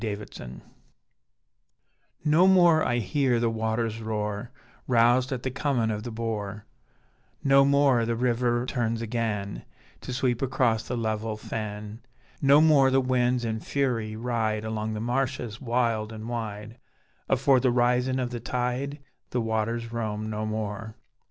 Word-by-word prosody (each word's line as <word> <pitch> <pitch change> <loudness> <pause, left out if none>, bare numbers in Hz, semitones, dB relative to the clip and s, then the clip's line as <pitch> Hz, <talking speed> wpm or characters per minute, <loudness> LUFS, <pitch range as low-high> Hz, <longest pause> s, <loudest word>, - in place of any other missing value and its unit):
Peter 105 -2 -3
Wray - - -10 1.8
No 160 +5 +5
more 175 -4 +6
I 120 - +1
hear 125 +2 +1
the 115 -1 +1
waters 110 0 -2
roar, 105 +1 -3 0.4
Roused 125 +2 +3
at 125 -2 -3
the 130 - -2
comin' 125 -4 0
of 105 -1 -3
the 120 - -6
bore, 110 -3 -4 0.8
No 135 0 +6
more 140 -3 +4
the 115 0 -1
river 120 0 +1
turns 115 -3 -1
agen, 110 -3 -2 0.4
To - - -6
sweep 125 -1 0
across 125 -4 +1
the 125 - -2
level 110 -1 -2
fen; 105 0 -6 0.4
No 140 +2 +6
more 150 -4 +5
the 135 0 +3
winds 125 -1 +1
in 110 -1 -2
fury 115 -5 -1
ride 110 -2 -1
Along 110 0 -3
the 105 - -4
marshes 120 -1 -2
wild 115 -3 0
and 110 0 -7
wide 115 -1 -5 0.5
Afore 135 0 +4
the 130 - +2
risin' 125 +2 +2
of 125 -1 -2
the 120 - -4
tide: 125 +4 -2 0.3
The 125 - -1
waters 115 +1 -2
roam 110 -2 -3
no 110 0 -3
more. 110 0 -4
115 Hz, 145 wpm, -26 LUFS, 110-125 Hz, 1.8 s, more